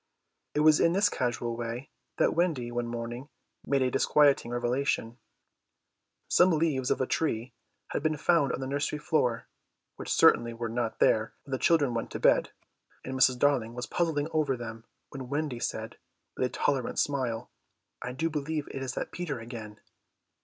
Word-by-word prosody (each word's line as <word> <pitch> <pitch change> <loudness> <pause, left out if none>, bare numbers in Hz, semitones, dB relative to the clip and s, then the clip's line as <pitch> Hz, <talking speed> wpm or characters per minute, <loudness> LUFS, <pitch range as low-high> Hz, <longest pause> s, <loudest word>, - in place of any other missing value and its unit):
It 150 - +3
was 155 0 +6
in 170 - +4
this 200 +2 +3
casual 120 - -2
way 120 +3 -5 0.3
that - - +3
Wendy 155 -9 0
one 120 0 -2
morning 120 +3 -5 0.3
made 140 -2 +1
a 130 - +1
disquieting 140 -1 +3
revelation. 120 -1 -1 1.1
Some 180 - +5
leaves 150 -6 +1
of - - +1
a - - +2
tree 125 -5 -1 0.4
had - - -2
been 155 0 0
found 145 -3 +3
on - - -3
the - - -2
nursery 145 +2 -1
floor, 125 -6 0 0.5
which - - -5
certainly 115 0 +4
were 115 0 -3
not 115 0 -2
there 110 0 +2
when 140 - -13
the 130 - -1
children 145 -7 +3
went 115 - -3
to - - -3
bed, - - +4 0.6
and 130 - -4
Mrs. 130 -1 +4
Darling 125 -4 +1
was 125 0 -4
puzzling 160 -4 0
over 150 -5 +1
them 115 -1 -8 0.2
when 130 -2 -8
Wendy 145 -3 -2
said - - -4 0.4
with 130 - +1
a - - -10
tolerant 130 0 -1
smile: 130 -6 -1 0.5
"I 125 - -4
do 130 +6 -1
believe 150 -1 -3
it 135 - -5
is 130 -1 -4
that - - -4
Peter 160 -7 -4
again!" 115 -3 -9
130 Hz, 175 wpm, -29 LUFS, 120-150 Hz, 1.1 s, was